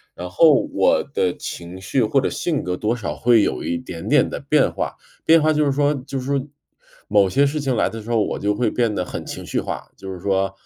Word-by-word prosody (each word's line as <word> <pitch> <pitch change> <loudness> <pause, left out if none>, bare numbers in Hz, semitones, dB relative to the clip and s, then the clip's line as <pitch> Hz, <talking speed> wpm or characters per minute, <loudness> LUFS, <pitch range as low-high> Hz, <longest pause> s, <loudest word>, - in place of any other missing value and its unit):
然 90 - -6
后， 160 - +4
我 275 -2 +3
的 90 -1 0
情 85 +2 -7
绪 115 +6 0
或 125 +6 +2
者 - - 0
性 160 -5 -2
格 90 0 -2
多 110 +5 -1
少 75 -11 -4
会 115 +3 +4
有 65 - -2
一 85 - -1
点 85 -10 -8
点 - - +4
的 - - -5
变 - - +2
化， - - -4 0.3
变 165 0 +6
化 155 +1 +3
就 150 0 +2
是 140 - +2
说 145 +1 +2
就 135 - -3
是 125 - -7
说 140 0 -1 0.6
某 100 -2 +4
些 140 +9 +3
事 150 +2 -1
情 135 -3 -1
来 - - +2
的 115 -1 -7
时 115 - -11
候， 115 -2 +2
我 - - -3
就 105 0 0
会 120 -1 +1
变 115 -3 0
得 90 - -1
很 - - -6
情 - - -7
绪 - - -1
化。 - - -6
就 95 0 -8
是 90 - -7
说， 95 0 0
115 Hz, 270 characters per minute, -21 LUFS, 95-140 Hz, 0.6 s, 变